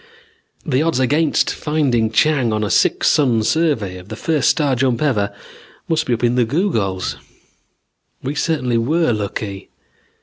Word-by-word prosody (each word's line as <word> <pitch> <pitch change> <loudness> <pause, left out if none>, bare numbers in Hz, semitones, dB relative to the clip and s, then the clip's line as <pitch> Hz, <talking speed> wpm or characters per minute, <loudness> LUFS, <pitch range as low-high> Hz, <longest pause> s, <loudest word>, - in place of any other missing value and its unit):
The 135 -3 +1
odds 160 -4 0
against 145 +4 +1
finding 135 -8 0
Chang 130 +1 +2
on 105 0 -1
a 105 - -2
six - - +2
sun 125 -8 +3
survey 115 - 0
on 90 - -14
the 110 - -7
first 155 +3 +1
star 145 -5 +1
jump 125 -1 0
ever 105 -9 0 0.6
must 160 -1 0
be 125 - +1
up 115 - -8
in 120 0 +3
the 125 0 +2
googols. 110 - -1 1.1
We 135 +2 -2
certainly 135 -7 0
were 155 +3 +1
lucky. 100 -1 -5
125 Hz, 155 wpm, -19 LUFS, 110-150 Hz, 1.1 s, sun